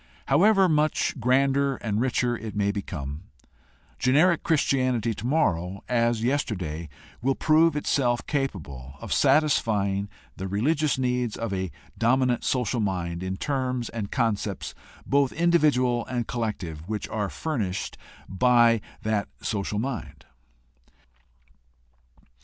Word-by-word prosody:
However 195 +6 +5
much 155 -1 +1
grander 135 +3 +2
and 110 -2 -2
richer 125 -1 +1
it 110 -2 -7
may 100 -1 +1
become, 75 -5 -6 0.7
generic 155 +7 +4
Christianity 130 -7 +1
tomorrow, 100 - 0
as 115 -2 +1
yesterday, 95 - -2 0.3
will 135 +2 +1
prove 160 0 +4
itself 125 -4 0
capable 70 - -4
of - - -3
satisfying 110 -9 +2 0.3
the 95 - -4
religious 145 - +1
needs 125 -3 0
of 115 -3 -3
a 95 -1 -2 0.3
dominant 125 +1 +2
social 125 -2 0
mind 90 -4 -2
in 95 0 -3
terms 130 -3 -2
and 110 -3 -5
concepts, 110 -5 -1 0.3
both 140 -1 +2
individual 150 -8 +3
and 120 -2 -2
collective, 100 -9 -4
which 110 -1 -3
are 105 -2 -2
furnished 110 - -3 0.3
by 115 +2 +4 0.2
that 105 -2 0
social 105 -1 -2
mind. 120 +1 -4
120 Hz, 110 wpm, -26 LUFS, 100-135 Hz, 0.7 s, However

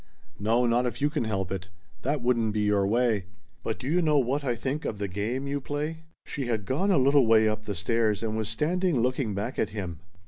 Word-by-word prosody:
"No, 115 +4 +2
not 120 +1 +2
if 120 - -4
you 145 +1 +1
can 150 -7 -1
help 95 -4 -2
it. 95 -1 -4 0.3
That 140 0 -1
wouldn't 115 -3 +1
be 105 - +1
your 105 -1 +2
way. 115 -3 +2 0.4
But 110 - -3
do 130 - -7
you 175 +5 +2
know 155 -3 +3
what 135 +2 +1
I 125 -3 0
think 135 +6 -3
of 105 - -3
the 100 0 -2
'game' 110 +8 -2
you 140 0 -2
play?" 150 +4 -4 0.2
She 140 -5 -4
had 110 -4 -1
gone 165 - 0
a 190 - +4
little 135 -1 +5
way 110 -1 +5
up 110 0 -2
the 100 - -3
stairs, 110 +2 +1
and 110 -1 -1
was 110 -1 -2
standing 175 -1 +1
looking 125 -3 0
back 105 +6 -3
at 110 - +1
him. 90 -7 -5
120 Hz, 235 wpm, -27 LUFS, 105-140 Hz, 0.4 s, little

